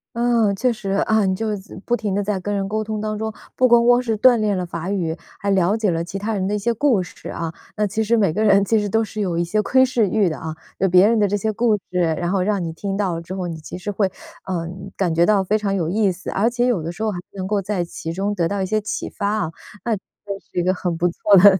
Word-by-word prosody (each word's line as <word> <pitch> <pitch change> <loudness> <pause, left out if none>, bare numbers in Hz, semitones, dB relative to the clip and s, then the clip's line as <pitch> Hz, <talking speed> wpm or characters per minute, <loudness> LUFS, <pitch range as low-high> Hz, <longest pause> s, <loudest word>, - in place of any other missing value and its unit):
嗯， 235 -4 +2
确 245 +4 +1
实， 205 -3 -6 0.2
啊， 220 -1 +3
你 190 -1 +1
就 225 +3 -2
是 210 - -2
自 190 - -13
不 240 - +2
停 210 -5 -2
地 205 - 0
在 205 -1 -1
跟 205 +3 -3
人 195 -1 -1
沟 215 +2 -1
通 215 0 -3
当 215 0 -2
中， 220 +1 -3 0.2
不 255 - +4
光 235 -1 +5
光 245 0 +5
是 225 -3 -1
锻 245 +2 +6
炼 210 -3 +1
了 180 - -2
法 170 +1 -5
语， 175 -5 -1 0.2
还 200 - 0
了 190 +2 +3
解 215 -4 +1
了 165 0 -1
其 180 +3 -5
他 210 +3 -2
人 190 -2 -1
的 210 - 0
一 - - +1
些 230 +3 0
故 235 -5 +2
事 175 - -10
啊。 165 -1 -4 0.2
那 210 - +2
其 220 +3 -1
实 230 +2 +2
每 200 -7 +2
个 215 +5 0
人 200 -2 +5
其 220 +2 +3
实 205 -1 -2
都 225 +3 +2
是 215 0 -5
有 180 -4 -1
一 170 - +2
些 210 +5 +1
窥 260 +4 +4
视 235 -5 +1
欲 210 -2 +2
的 160 - -1
啊。 160 -1 -5 0.2
有 190 - +2
别 180 +3 +6
人 230 0 +3
的 205 - +4
这 205 +1 0
些 220 +2 -1
故 225 0 +2
事， 180 - 0 0.2
然 175 0 -1
后 195 -1 +1
让 200 -1 0
你 165 -1 -4
听 195 +3 -3
到 195 -4 0
了 165 - -4
之 180 +3 -7
后， 180 -2 -3
你 165 - -5
其 155 - -8
实 185 +3 -4
会， 200 0 +1 0.4
呃， 170 -3 -2 0.3
感 180 -4 +1
觉 170 +1 +3
到 205 -2 +4
非 210 +3 +1
常 200 -2 -1
有 170 -4 0
意 200 +1 +2
思。 185 +2 -6
而 215 +5 +2
且 240 0 0
有 240 -8 +1
的 165 +2 -4
时 205 +6 -6
候 220 - +1
还 180 - -5
能 190 -2 -4
够 200 +1 0
在 185 -3 -2
其 165 -1 -6
中 195 +4 -1
得 170 -4 +1
到 200 0 -1
一 - - 0
些 215 +3 0
启 210 - -4
发 200 - -2
啊， 205 -7 -1 0.3
那 230 - +1
这 195 - -9 0.5
是 - - -1
一 - - +1
个 185 +1 +2
很 180 -2 -2
不 175 - +2
错 200 +3 +4
的 195 0 +8
200 Hz, 320 characters per minute, -21 LUFS, 180-215 Hz, 0.5 s, 的